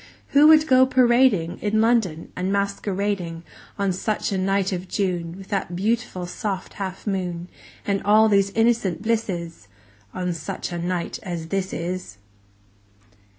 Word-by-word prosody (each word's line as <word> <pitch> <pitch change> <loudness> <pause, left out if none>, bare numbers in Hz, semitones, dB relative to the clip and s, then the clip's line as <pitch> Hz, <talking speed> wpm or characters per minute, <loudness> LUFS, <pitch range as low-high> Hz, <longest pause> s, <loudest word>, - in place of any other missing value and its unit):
Who 290 +2 +6
would 310 -1 +7
"go 260 -3 +5
parading" 240 -9 +3
10 210 - -2
In 220 - +3
London, 220 -8 +1
"and 185 +1 -2
masquerading," 200 -3 -2 0.3
On 200 -2 0
such 210 +4 -2
a 195 - 0
night 195 +1 +1
of 185 0 -4
June 175 -4 -2
With 195 0 -12
that 195 -3 -2
beautiful 210 -1 -1
soft 190 +1 -4
half 190 -1 -5
moon, 180 -3 -3 0.4
And 200 -1 0
all 215 +2 +5
these 200 -2 +3
innocent 225 -5 +1
blisses? 180 - -2 0.4
On 180 -1 -2
such 160 +2 -5
a 175 - -3
night 175 0 -3
as 170 -3 -5
this 190 0 -1
is! 170 - -5
195 Hz, 150 wpm, -23 LUFS, 175-215 Hz, 0.4 s, would